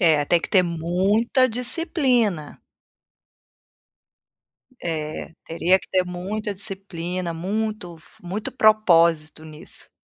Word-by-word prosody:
É, 155 -5 +4
tem 170 +2 +2
que - - -6
ter 185 -3 +5
muita 190 +9 +1
disciplina. 245 - +1 2.2
É, 155 -1 -4
teria 170 +3 +2
que - - -16
ter 185 -1 +1
muita 195 +4 -4
disciplina, 185 -3 -5
muito 195 0 -4
f - - -17
muito 190 +5 -5
propósito 170 -8 +3
nisso. 155 +2 -11
180 Hz, 100 wpm, -22 LUFS, 165-215 Hz, 2.2 s, ter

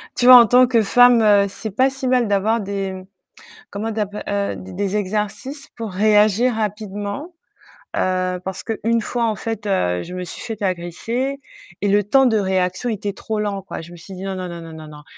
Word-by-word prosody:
tu 245 - 0
vois, 255 0 +11
en 235 - +6
tant 250 +2 +5
que 235 -3 +3
femme, 220 -3 +5
c'est 220 +1 -7
pas 260 +6 +3
si 265 -1 -5
mal 250 -3 +2
d'avoir 205 +3 +1
des 195 -1 -4 0.7
comment 220 +3 -4
d'app 210 -1 -3
heu, 200 0 -1
d 190 0 -10
des 200 +1 -2
exercices 210 +8 -4
pour 225 -4 -5
réagir 215 +4 +3
rapidement, 210 - -4 0.6
heu, 185 0 0
parce 190 0 -5
que 225 -2 -4
1 230 +1 +2
fois 235 +2 -2
en 220 -2 0
fait, 225 -2 -5
heu, 90 - 0
je 180 - -9
me 180 0 -5
suis - - -9
faite 225 -3 -6
agresser 205 +9 -2 0.4
et 205 - +1
le 205 +1 +3
temps 265 +7 +4
de 230 -3 +3
réaction 190 +3 0
était 205 -2 -3
trop 220 +2 -4
lent, 205 -2 -2
quoi. 190 - -7
Je 170 +2 -12
me - - -11
suis 180 +4 -12
dit: 185 +1 -8
«Non, 195 -1 -3
non, 185 -1 -5
non, 170 0 -7
non, 165 -1 -10
non, 155 -1 -10
non. 150 -1 -12
205 Hz, 210 wpm, -20 LUFS, 190-230 Hz, 0.7 s, vois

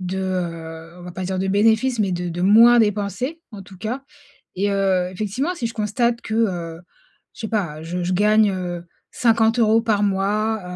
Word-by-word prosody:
de 185 +1 -4
heu, 170 -3 -5
on - - -11
va 180 - -8
pas 185 0 -5
dire 185 0 -2
de 190 - -1
bénéfices 220 +5 +2
mais 195 -4 +1
de 175 0 -3
de 175 +1 -5
moins 230 +5 +7
dépenser 215 - -1
en 200 -2 -8
tout 190 0 -14
cas. 230 +7 -4 0.5
Et 200 +2 0
heu, 190 -2 +1
effectivement 215 - -3
si 235 - -2
je 230 - -6
constate 230 +3 0
que, 220 - -5
heu, 175 -7 -1 0.5
je - - -14
sais 220 - -4
pas, 175 -9 -2
je 175 +2 -4
je 180 - -1
gagne, 210 +2 +4
heu, 175 -2 -5 0.3
50 225 -1 +2
euros 225 -1 +4
par 215 -3 +1
mois, 205 +2 0
200 Hz, 195 wpm, -21 LUFS, 180-225 Hz, 0.5 s, moins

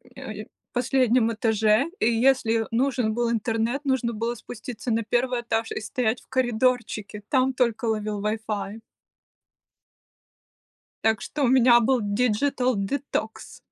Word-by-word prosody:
э, - - -7 0.3
последнем 245 -2 +2
этаже, 220 +2 +2
и - - +1
если 230 -2 +2
нужен 245 -2 +1
был 235 0 0
интернет, 230 +4 -1
нужно 250 -3 0
было 230 +2 -2
спуститься 235 +2 -7
на 225 +1 +1
1 245 0 +1
этаж 225 -1 -2
и - - -3
стоять 220 +2 -1
в - - -24
коридорчике. 240 -4 0
Там 260 -1 +2
только 235 -2 0
ловил 215 -2 -2
вайфай. 215 0 -3 2.2
Так 220 -1 +2
что 295 - -3
у - - +4
меня 245 -1 +6
был 250 +2 +2
диджитал-детокс. 240 +1 -1
235 Hz, 125 wpm, -25 LUFS, 220-255 Hz, 2.2 s, меня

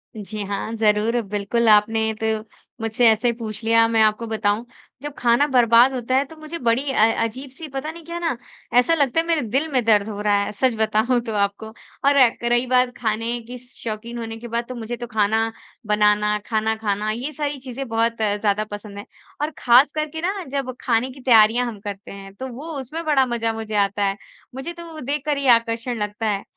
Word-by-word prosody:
जी 210 0 -5
हाँ, 200 +2 -4
ज़रूर। 220 +2 +2
बिल्कुल 210 +3 -1
आपने 220 +1 +4
तो 220 - 0 0.5
मुझसे 225 +2 +2
ऐसे 225 +2 +2
पूछ 220 -2 -7
लिया, 230 0 +4
मैं 225 -1 +2
आपको 215 +2 +1
बताऊँ 215 +1 0 0.4
जब 290 0 -6
ख़ाना 240 +4 +3
बर्बाद 245 0 +5
होता 255 0 -2
है 275 +2 +3
तो 320 - -14
मुझे 310 +2 -7
बड़ी 255 +3 +1
अ - - -4
अ, 225 +1 +4
अजीब 255 +5 -5
सी 290 +5 -9
पता 275 +3 -4
नहीं 335 0 -12
क्या 340 +1 -5
ना 330 -7 -1 0.4
ऐसा 250 +7 +4
लगता 285 -1 +2
है 330 - 0
मेरे 325 -3 +2
दिल 265 +7 0
में 255 -3 +2
दर्द 210 -2 +4
हो 205 - -6
रहा 210 -1 +2
है, 205 - -4
सच 235 +3 0
बताऊँ 220 +3 +2
तो 230 -2 -5
आपको। 200 +1 -1 0.4
और 280 - +5 0.2
क - - -15
रही 240 +1 +3
बात 250 0 +2
खाने 230 +1 -1
की 250 +1 -7
शौकीन 235 -2 -7
होने 225 -1 -5
के 235 +1 -9
बाद 235 +1 -2
तो 255 - -5
मुझे 235 +1 -5
तो 240 +1 -6
ख़ाना 220 0 +1 0.4
बनाना, 210 0 +3
खाना 220 0 0
ख़ाना 215 -1 -1
ये 250 +7 -4
सारी 295 0 -3
चीज़ें 260 +1 -6
बहुत 230 0 0
ज़्यादा 210 0 +1
पसंद 205 0 -8
हैं 205 - -7 0.4
और 305 +1 -1
ख़ास 255 +4 +5
करके 310 +1 -3
ना 380 +2 -2
जब 270 -2 -2
खाने 245 +1 +1
की 265 - -13
तैयारियाँ 235 -1 +5
हम 220 -4 -7
करते 200 -1 -8
हैं 195 0 -10
तो 260 +5 -6
वो 275 +6 -8
उसमें 305 +6 -6
बड़ा 280 -4 +3
मज़ा 230 -2 -1
मुझे 220 -1 -5
आता 200 0 +1
है। 195 0 -1 0.4
मुझे 275 +6 -5
तो 340 0 -10
वो 310 - -8
देखकर 290 +1 -2
ही 275 - -1
आकर्षण 230 +1 -4
लगता 210 +1 -3
है। 200 -1 -1
230 Hz, 210 wpm, -22 LUFS, 215-260 Hz, 0.5 s, बर्बाद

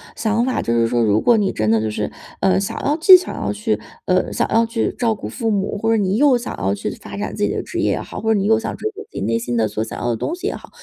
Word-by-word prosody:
想 225 +2 0
法， 260 - 0
就 115 - -1
是 115 -1 +3
说 120 0 +1
如 105 -1 +3
果 235 -2 +4
你 200 -2 +1
真 110 0 0
的 110 -1 +3
就 110 - -1
是， 105 - -3 0.3
呃， 190 0 +3
想 195 - -3
要 290 - +2
既 370 +3 +9
想 365 - -6
要 100 - -2
去 105 +1 -1 0.3
呃， 185 0 +1
想 - - 0
要 225 +1 +4
去 230 0 -1
照 230 -3 +1
顾 - - -7
父 230 -3 -3
母， 205 -1 -1
或 225 - +1
者 225 - +3
你 195 -1 +1
又 270 -1 +5
想 240 - -6
要 95 +2 0
去 100 - -4
发 - - -9
展 - - -4
自 - - -2
己 - - +2
的 - - -2
职 - - -5
业 - - +2
也 - - -1
好， - - -7
或 225 +1 +1
者 215 - +3
你 195 - -1
又 220 +1 +4
想 225 - -4
追 430 - -2
求 425 0 -10
自 430 - -13
己 - - -3
内 115 0 0
心 120 +1 -3
的 110 -1 +2
所 110 +1 -3
想 110 - -7
要 120 - -1
的 120 - +1
东 325 - -3
西 365 +2 -8
也 - - -1
好， - - -12
200 Hz, 350 characters per minute, -20 LUFS, -, 0.3 s, 既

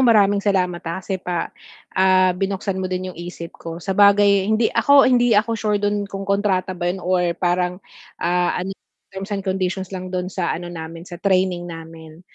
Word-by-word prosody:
maraming 205 -5 +4
salamat, 180 -4 0
ah, 165 - -3
kasi 190 -1 -3
pa 175 -2 -3 0.4
ah, 185 -1 +4
binuksan 195 0 -2
mo 185 - -2
din 185 0 -3
'yong 170 - -11
isip 170 -1 -7
ko, 165 0 -8
sabagay 200 +2 +4
hindi 220 +1 +2
ako 280 -1 +6
hindi 245 -3 +4
ako 215 +2 +2
sure 215 -2 0
do'n 205 0 -1
kung 195 0 -6
kontrata 200 -2 0
ba 175 -1 -2
'yon 180 - -1
or 180 -2 +1
parang, 180 0 0 0.4
ah, 175 0 0
ano 185 +2 -3 0.4
terms 195 +2 -6
and 200 - -1
conditions 190 0 -2
lang 185 -1 -5
do'n 185 0 -2
sa 180 -3 -1
ano 175 +1 -7
namin, 165 0 -8
sa 175 - -9
training 185 -2 +1
namin. 165 -1 -10
185 Hz, 185 wpm, -21 LUFS, 175-200 Hz, 0.4 s, ako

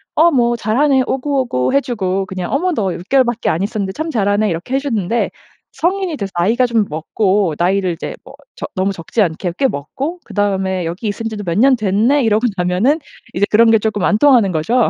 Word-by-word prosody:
"어 335 +2 +5
뭐 240 -3 +2
잘하네." 260 +5 +2
오구오구 260 - -1
해주고 205 -9 0
그냥 185 -2 -5
"어머 360 +6 +1
너 195 - -1
6 - - -7
개월밖에 245 -4 +2
안 165 - 0
있었는데 200 -2 -2
참 315 +10 -4
잘하네." 205 -3 +1
이렇게 175 +10 -3
해주는데 235 -6 -1 0.4
성인이 370 -1 -1
돼서 200 -7 -5
나이가 230 +8 +2
좀 230 -3 +1
먹고 185 +3 0
나이를 185 +1 +1
이제 165 - -6
뭐 - - -14 0.3
적 - - -5
너무 190 +1 0
적지 190 +5 -2
않게 175 -1 -1
꽤 270 - +4
먹고 265 - -5
그다음에 190 -3 -1
"여기 175 +7 -5
있은 225 +2 -4
지도 210 -2 -6
몇 170 -2 -2
년 265 +2 +5
됐네?" 225 +6 +2
이러고 220 +1 +2
나면은 180 - +2 0.4
이제 200 - +2
그런 225 +2 +5
게 225 - +6
조금 210 -2 -2
안 210 - +3
통하는 240 -7 +4
거죠. 225 +10 +1
215 Hz, 390 characters per minute, -17 LUFS, 190-255 Hz, 0.4 s, 게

